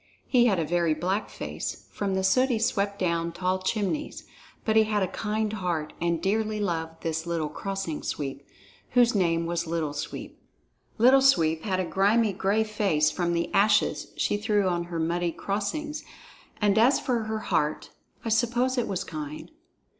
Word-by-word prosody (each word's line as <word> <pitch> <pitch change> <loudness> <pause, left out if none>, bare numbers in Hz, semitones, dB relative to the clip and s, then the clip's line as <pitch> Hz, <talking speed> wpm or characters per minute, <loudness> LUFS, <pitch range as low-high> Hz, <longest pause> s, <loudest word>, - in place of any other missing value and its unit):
He 245 -2 +4
had 200 -5 +2
a 165 - 0
very 170 -1 +1
black 185 +6 -1
face, - - -5
from 195 -2 -2
the 190 - 0
soot 255 +8 +3
he 240 - +1
swept 205 -3 0
down 170 -3 0
tall 185 +2 -1
chimneys, 215 +9 -2 0.4
but 220 - +1
he 220 0 +6
had 210 -2 +1
a - - +1
kind 215 +3 -2
heart 175 -7 -2
and 170 -1 +1
dearly 215 +4 0
loved 165 -4 -3
this 160 0 -2
little 165 -3 -1
Crossing 195 -1 -4
Sweeper, 140 -1 -4 0.5
whose 245 -1 +5
name 170 -4 +1
was 170 0 -2
Little 160 -3 -2
Sweep. - - -6 0.6
Little 255 +4 +6
Sweep 165 -12 +4
had 190 -3 0
a 185 - 0
grimy, 205 +4 +2
gray 200 +4 +1
face 195 -8 +1
from 170 +2 -1
the 170 0 -1
ashes 205 +1 +3
she - - +1
threw 205 -2 +1
on 175 -1 0
her 170 -1 -5
muddy 170 +1 0
crossings, 210 - -3 0.6
and 210 0 +3
as 250 +5 +5
for 235 -4 -1
her 220 0 -2
heart, 160 -7 -1 0.3
I - - -1
suppose 240 +3 +1
it 240 - -1
was 190 - -2
kind. 155 -1 -7
195 Hz, 175 wpm, -27 LUFS, 170-220 Hz, 0.6 s, he